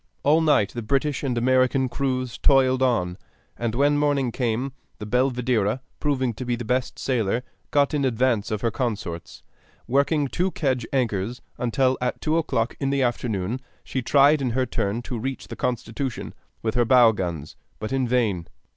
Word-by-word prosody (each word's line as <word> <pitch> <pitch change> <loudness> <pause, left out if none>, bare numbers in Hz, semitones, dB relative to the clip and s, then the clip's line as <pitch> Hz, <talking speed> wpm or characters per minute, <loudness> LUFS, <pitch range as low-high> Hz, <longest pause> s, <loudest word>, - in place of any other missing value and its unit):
All 155 +3 +4
night 145 -10 +3
the 120 - -4
British 135 +5 0
and 130 -4 -1
American 130 +2 +3
crews 130 -1 -2
toiled 130 -2 +4
on, 95 -9 +1 0.4
and 115 -1 -2
when 145 +2 +3
morning 140 -4 +1
came 125 +2 -1 0.2
the 105 - -7
Belvidera, 125 -2 +1 0.2
proving 130 -5 0
to 120 - -6
be 120 -1 -1
the 120 -1 -6
best 125 +2 -1
sailer, 120 -2 0 0.3
got 145 +1 +2
in 145 -2 +1
advance 120 -3 +1
of 110 -2 -2
her 115 - +1
consorts, 105 - -4 0.4
working 140 +3 +2
two 180 +7 0
kedge 130 -8 -1
anchors, 120 -3 -1 0.2
until 130 +2 +1
at 125 - -1
two 160 +1 +1
o'clock 125 -7 -1
in 135 - 0
the 140 -1 +1
afternoon 120 -2 -1 0.2
she 130 - -3
tried 140 +4 +4
in 130 - 0
her 130 - +2
turn 115 -1 -2
to 120 -1 -4
reach 135 +3 -5
the - - -6
Constitution 125 +1 -3 0.3
with 110 - 0
her 120 -1 +3
bow 120 -1 +6
guns, 85 -7 -4 0.2
but 110 +4 -4
in 130 -2 +1
vain. 110 -9 0
125 Hz, 175 wpm, -24 LUFS, 115-135 Hz, 0.4 s, bow